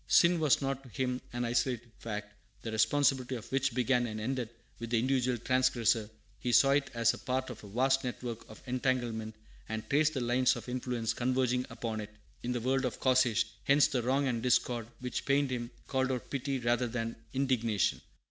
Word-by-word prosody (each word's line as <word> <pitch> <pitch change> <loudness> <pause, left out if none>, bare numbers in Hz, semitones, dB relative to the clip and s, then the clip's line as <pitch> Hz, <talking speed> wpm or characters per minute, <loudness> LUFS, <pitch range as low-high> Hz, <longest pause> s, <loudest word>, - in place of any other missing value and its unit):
Sin 170 0 +5
was 150 -3 +3
not 135 0 -1
to 135 - -14
him 125 +1 -2
an 120 0 -2
isolated 120 0 -1
fact, 105 -2 -5 0.3
the 115 - -4
responsibility 130 +3 +2
of 115 - -7
which 135 -2 +1
began 125 -1 +2
and 110 -1 -5
ended 125 +1 -2 0.3
with 115 - -5
the 120 - +2
individual 125 0 +1
transgressor; 120 -3 +2 0.3
he 125 - -1
saw 135 +4 +6
it 140 0 +2
as 115 0 +3
a - - -8
part 130 +1 -2
of 115 - -10
a - - -9
vast 130 +6 +2
network 120 -2 -5
and 110 - -11
entanglement, 120 -4 -1 0.3
and 110 0 -4
traced 150 +2 +3
the - - 0
lines 125 +1 +3
of 120 0 -8
influence 125 -2 -2
converging 125 0 0
upon 110 -2 -4
it 105 - -7 0.3
in 120 - -2
the 125 - 0
underworld 130 +3 +1
of 125 - -3
causation. 125 -4 +3 0.2
Hence 140 +1 +6
the 125 - 0
wrong 135 +4 +1
and 120 -3 -1
discord 120 -2 +1
which 125 0 -3
pained 140 -1 +2
him 120 -1 -3 0.2
called 130 -1 0
out 125 -2 -4
pity, 135 0 -1
rather 120 0 +1
than 115 -1 -3 0.2
indignation. 120 -7 +1
125 Hz, 195 wpm, -31 LUFS, 115-130 Hz, 0.3 s, saw